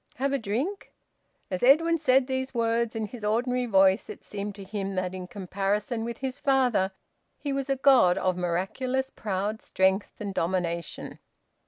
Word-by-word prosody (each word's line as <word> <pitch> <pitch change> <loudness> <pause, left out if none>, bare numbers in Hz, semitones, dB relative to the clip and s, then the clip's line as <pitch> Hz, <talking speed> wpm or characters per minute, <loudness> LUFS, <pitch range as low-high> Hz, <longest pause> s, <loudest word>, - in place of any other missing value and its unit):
Have 275 +2 -1
a 275 - +1
drink?" 255 - -3 0.6
As 185 - -2
Edwin 330 +6 +5
said 265 -3 +4
these 260 0 -3
words 230 0 +1
in 220 -1 -1
his 220 +1 -10
ordinary 245 +4 0
voice, 195 -1 +4
it - - -9
seemed 205 0 -5
to 200 - -9
him 195 0 -4
that 185 0 -2
in 185 -1 -6
comparison 200 +4 -2
with 235 0 -4
his 260 +1 -4
father 250 -8 +2 0.5
he 285 -2 -3
was 275 0 -2
a 275 - +2
god 260 -9 +5
of 185 -1 +1
miraculous 195 +10 -1
proud 205 +1 -3
strength 190 +2 +1
and 200 -2 -4
domination. 170 -1 -2
220 Hz, 165 wpm, -27 LUFS, 190-260 Hz, 0.6 s, Edwin